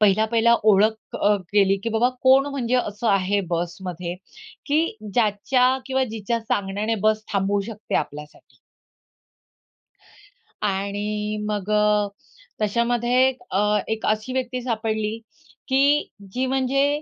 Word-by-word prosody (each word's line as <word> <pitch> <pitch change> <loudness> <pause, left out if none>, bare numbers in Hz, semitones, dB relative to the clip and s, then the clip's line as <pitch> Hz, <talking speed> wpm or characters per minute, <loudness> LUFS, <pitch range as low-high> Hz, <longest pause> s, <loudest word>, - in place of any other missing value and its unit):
पहिला-पहिला 220 +3 +4
ओळख 215 +1 +2
अ, 205 +1 +3 0.2
केली 195 -1 +4
की - - 0
बाबा, 245 +2 +4
कोण 265 +1 +5
म्हणजे 255 -3 -1
असं 225 -1 -1
आहे 200 0 +2
बसमध्ये, 175 0 -3 0.5
की 305 -4 +1 0.2
ज्याच्या 250 +4 +2
किंवा 265 -1 +1
जिच्या 225 +2 -2
सांगण्याने 205 0 -1
बस 215 0 0
थांबवू 200 0 +1
शकते 215 -1 -7
आपल्यासाठी. 150 +1 -6 2.0
आणि 210 +1 -2
मग 205 -1 -3
अ, 210 -1 +3 0.5
त्याच्यामध्ये 240 +4 +2 0.3
अ, 210 0 +2
एक 220 0 -2
अशी 215 +4 -1
व्यक्ती 255 -1 -2
सापडली, 220 -2 -2 0.5
की 280 +3 +3 0.2
जी 255 +4 -1
म्हणजे, 275 +3 +1
215 Hz, 115 wpm, -23 LUFS, 205-250 Hz, 2.0 s, कोण